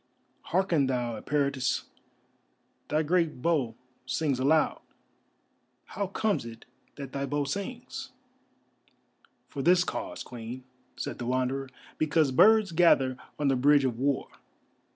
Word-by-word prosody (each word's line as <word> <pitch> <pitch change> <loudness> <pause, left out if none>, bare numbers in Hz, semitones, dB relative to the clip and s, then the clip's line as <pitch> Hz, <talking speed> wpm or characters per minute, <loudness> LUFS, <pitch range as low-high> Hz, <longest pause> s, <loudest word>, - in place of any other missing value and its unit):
"Hearken 170 -6 +2
thou, 120 -3 -1
Eperitus, 140 +1 0 1.0
thy 155 +1 +1
great 165 -4 0
bow 145 -9 +1 0.3
sings 135 +1 0
aloud. 150 +4 +2 1.0
How 200 0 -3
comes 205 +2 0
it 115 -1 -10 0.3
that 140 -2 -7
thy 140 0 -2
bow 145 0 0
sings?" 215 - -5 1.4
"For 140 - -5
this 180 +5 +5
cause, 310 - -5
Queen," 120 +1 -8 0.3
said - - -5
the 120 - -4
Wanderer; 130 +1 -1 0.3
"because 155 -2 +2
birds 215 +7 +5
gather 160 -6 +4 0.2
on 145 - 0
the 135 - +3
Bridge 140 +2 +4
of 120 -3 -2
War. 140 0 0
140 Hz, 120 wpm, -28 LUFS, 130-170 Hz, 1.4 s, this